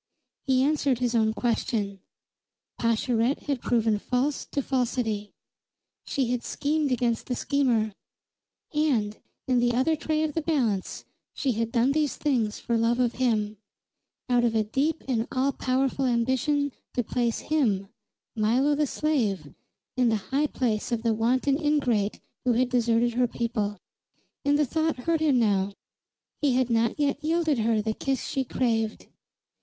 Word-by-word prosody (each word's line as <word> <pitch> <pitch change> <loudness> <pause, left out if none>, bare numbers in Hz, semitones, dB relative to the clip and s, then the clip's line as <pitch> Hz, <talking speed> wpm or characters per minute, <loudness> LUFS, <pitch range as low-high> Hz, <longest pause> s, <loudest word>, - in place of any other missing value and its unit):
He 260 -1 +3
answered 285 -3 +2
his 245 0 0
own 220 -2 +3
question. 220 -3 -1 0.8
Pascherette 230 +2 +1
had 280 -4 -2
proven 225 -3 +1
false 265 +6 -1
to 280 - -2
falsity; 235 -5 -1 0.7
she 260 -3 -1
had 250 -1 0
schemed 295 -1 -1
against 240 -2 0
the 250 - -1
schemer; 240 -8 +1 0.8
and, 250 -9 +1 0.3
in 255 -2 +3
the 240 0 +2
other 265 +7 +2
tray 310 0 -1
of 310 -1 -1
the 325 - -1
balance 250 - -1 0.3
she 270 - 0
had 230 0 -2
done 245 +2 +3
these 300 -1 0
things 235 -8 0
for 235 -1 -1
love 235 +2 +2
of 245 -2 +2
him, 215 -4 +1 0.7
out 245 -2 +3
of 230 -1 +1
a 220 - +3
deep 280 +9 -1
and 235 -3 0
all 265 +2 +1
powerful 265 +1 0
ambition 260 +4 +1 0.2
to 245 - +1
place 235 0 -1
him, 215 -11 +2 0.5
Milo 240 +7 +2
the 295 0 +1
slave, 220 - -1 0.4
in 250 -2 +3
the 225 - +2 0.2
high 290 +3 +2
place 235 -5 -1
of 230 -1 -1
the 230 -1 +2
wanton 255 +5 +1
ingrate 250 -9 +1 0.2
who 250 - +2
had 245 +2 +2
deserted 235 -1 +2
her 245 +1 +2
people. 225 -3 -2 0.7
And 285 +1 +3
the 300 - +3
thought 315 +3 0
hurt 325 +6 0
him 295 -5 +3
now; 200 -4 +2 0.7
he 280 -4 +2
had 255 -1 +1
not 230 +3 +1
yet 285 -1 0
yielded 320 -4 +1
her 220 -1 +1
the 220 0 -1
kiss 270 +3 -2
she 270 - -1
craved. 225 -4 -1
245 Hz, 155 wpm, -26 LUFS, 225-280 Hz, 0.8 s, He